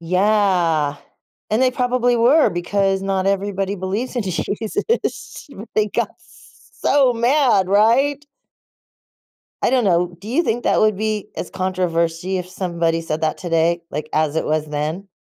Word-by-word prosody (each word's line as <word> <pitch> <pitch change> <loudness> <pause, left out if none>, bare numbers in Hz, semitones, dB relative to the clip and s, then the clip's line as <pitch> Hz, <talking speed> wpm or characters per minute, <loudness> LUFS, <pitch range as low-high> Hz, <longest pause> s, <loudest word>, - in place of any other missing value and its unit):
Yeah, 180 -5 +1 0.5
and 220 +4 +2
they 255 - +4
probably 250 -1 +1
were 260 +7 +4
because 195 +2 0
not 195 -1 -1
everybody 195 0 -1
believes 200 +8 -4
in 240 - 0
Jesus. 220 - -3 0.3
They 215 -1 +2
got - - -1
s - - -22
so 270 -3 +3
mad, 240 -5 +2
right? 255 +9 +3 1.4
I - - +2
don't 255 -3 +2
know. 175 -2 +1
Do 205 - -10
you 275 +9 +2
think 240 -2 -1
that - - +2
would 215 -2 +3
be 215 0 -3
as - - -5
controversy 180 -1 -1
if 180 0 -6
somebody 170 -3 -1
said 160 -1 -4
that 155 -1 0
today, 170 -1 0
like, 150 +1 -5
as 155 0 0
it - - 0
was 155 0 0
then? 155 +6 -4
195 Hz, 150 wpm, -20 LUFS, 170-230 Hz, 1.4 s, they